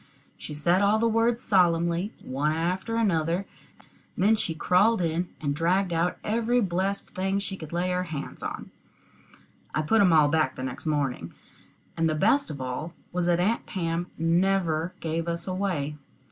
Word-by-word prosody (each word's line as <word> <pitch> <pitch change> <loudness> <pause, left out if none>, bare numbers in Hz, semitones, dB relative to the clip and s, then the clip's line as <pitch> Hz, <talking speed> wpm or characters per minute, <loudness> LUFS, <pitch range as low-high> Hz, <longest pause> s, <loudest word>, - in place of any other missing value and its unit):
She 150 - -7
said 175 +5 +2
all 205 +2 +4
the 230 +1 +2
words 230 +1 +1
solemnly, 170 0 +2
one 145 +4 -1
after 180 +7 -1
another; 180 -4 +1 0.7
then 205 +4 +4
she 170 -6 -2
crawled 200 +7 +3
in, 170 +1 -1
and 145 -2 -1
dragged 180 +3 +1
out 170 +2 0
every 230 +3 +1
blessed 195 -1 -1
thing 190 +1 -1
she 200 -1 -3
could 160 -5 -9
lay 175 +2 0
her 180 0 0
hands 150 -4 -6
on. - - -6 1.0
I 155 - +1
put 220 +8 +3
'em 185 -3 +5
all 155 -2 +6
back 155 -3 +1
the 130 - -6
next 130 +4 -5
morning, 135 - -1 0.6
and 165 -1 +1
the 155 - 0
best 225 - +2
of 145 -3 -6
it - - -3
all 150 +7 -5 0.2
was 175 -1 0
that 175 -1 +3
Aunt 215 +6 0
Pam 170 -1 -2
never 170 0 +1
gave 165 +1 -2
us 170 +1 -3
away. 180 -6 -2
175 Hz, 175 wpm, -26 LUFS, 160-195 Hz, 1.0 s, all